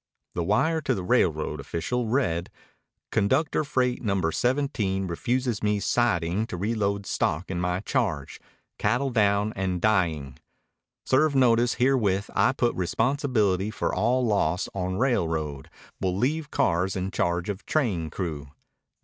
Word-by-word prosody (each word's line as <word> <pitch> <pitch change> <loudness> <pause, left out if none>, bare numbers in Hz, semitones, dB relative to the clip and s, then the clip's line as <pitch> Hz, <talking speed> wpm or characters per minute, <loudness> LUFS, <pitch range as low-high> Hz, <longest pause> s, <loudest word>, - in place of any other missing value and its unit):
The 85 - -1
wire 155 - +2
to - - 0
the 95 - -4
railroad 80 - +1
official 85 - -2
read: 100 -9 0 0.6
Conductor 130 +10 +1
freight 130 -4 0
number 100 -7 0
17 120 - 0
refuses 120 +6 -1
me 105 -1 +1
siding 100 -2 +1
to 90 - -5
reload 100 0 -1
stock 90 +1 -1
in 90 -1 -2
my 90 +1 -1
charge. 80 - -2 0.4
Cattle 135 +3 +1
down 105 -2 +2
and 95 -2 -1
dying. 80 -10 0 0.7
Serve 145 +2 +3
notice 120 -2 +4
herewith 110 -7 +1
I - - +3
put 120 -2 0
responsibility 110 - +1
for 110 - -2
all 125 +1 +2
loss 90 -6 +1
on 95 -1 -2
railroad. 80 - -1 0.3
Will 95 -1 -1
leave 150 +7 0
cars 90 -3 +1
in 95 0 -2
charge 85 0 0
of 100 -1 -5
train 100 - 0
crew. 75 -5 -5
100 Hz, 135 wpm, -26 LUFS, 90-125 Hz, 0.7 s, notice